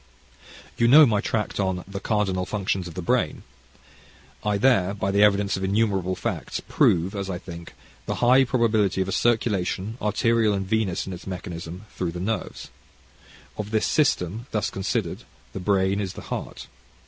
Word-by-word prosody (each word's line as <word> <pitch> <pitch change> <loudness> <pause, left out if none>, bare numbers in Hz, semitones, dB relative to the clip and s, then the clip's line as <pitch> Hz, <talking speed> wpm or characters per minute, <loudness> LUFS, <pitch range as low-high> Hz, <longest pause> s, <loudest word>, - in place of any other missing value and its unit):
You 115 - +4
know 150 +5 +9
my 105 -5 +1
tract 105 -1 -2
on 95 -2 -1
"The 100 0 -5
Cardinal 95 -3 0
Functions 95 -3 -2
of 85 - -10
the 90 - -4
Brain." - - 0 1.0
I 105 -1 +1
there, 100 -5 +3
by 95 -1 -1
the 100 +1 +3
evidence 100 -1 +3
of 95 - -4
innumerable 95 -2 +1
facts, - - -3
prove, 90 +3 +2
as 100 -1 -4
I 90 - -2
think, 85 -2 -10 0.3
the - - -1
high 125 +2 +5
probability 110 -7 +1
of 95 - -1
a - - -3
circulation 110 -1 0
arterial 110 0 +2
and 95 0 -2
venous 105 -3 0
in 95 - -6
its 90 - -10
mechanism, 90 0 -6
through 85 -2 -2
the 90 - -5
nerves. 110 +5 -4 0.9
Of 105 -1 -3
this 110 0 +1
system, 115 - +1
thus 105 - -1
considered, 95 -1 -2 0.3
the - - -4
brain 95 +1 +1
is 95 -3 -4
the - - -9
heart. - - -6
100 Hz, 170 wpm, -24 LUFS, 95-110 Hz, 1.0 s, know